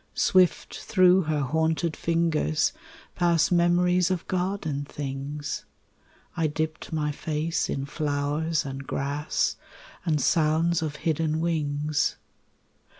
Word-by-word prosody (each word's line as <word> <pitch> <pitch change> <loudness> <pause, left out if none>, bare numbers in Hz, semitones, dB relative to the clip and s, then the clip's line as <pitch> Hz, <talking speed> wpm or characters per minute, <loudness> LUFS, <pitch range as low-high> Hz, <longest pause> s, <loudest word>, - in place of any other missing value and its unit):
Swift 185 -2 +2
through 185 -2 +4
her 155 -3 -1
haunted 160 +3 0
fingers 165 -2 +1 0.4
pass 170 -3 +2
Memories 180 +1 +3
of 185 -2 -2
garden 180 -6 -1
things; 140 +1 -5 0.7
I 165 -2 +1
dipped 155 +1 -3
my 150 -2 0
face 155 +2 -2
in 135 - -2
flowers 150 +2 -1
and 135 0 -6
grass 145 +2 -1 0.5
And 160 -4 +1
sounds 160 +3 +2
of 155 -2 -3
hidden 160 -1 +1
wings. 150 -2 0
155 Hz, 105 wpm, -26 LUFS, 150-170 Hz, 0.7 s, through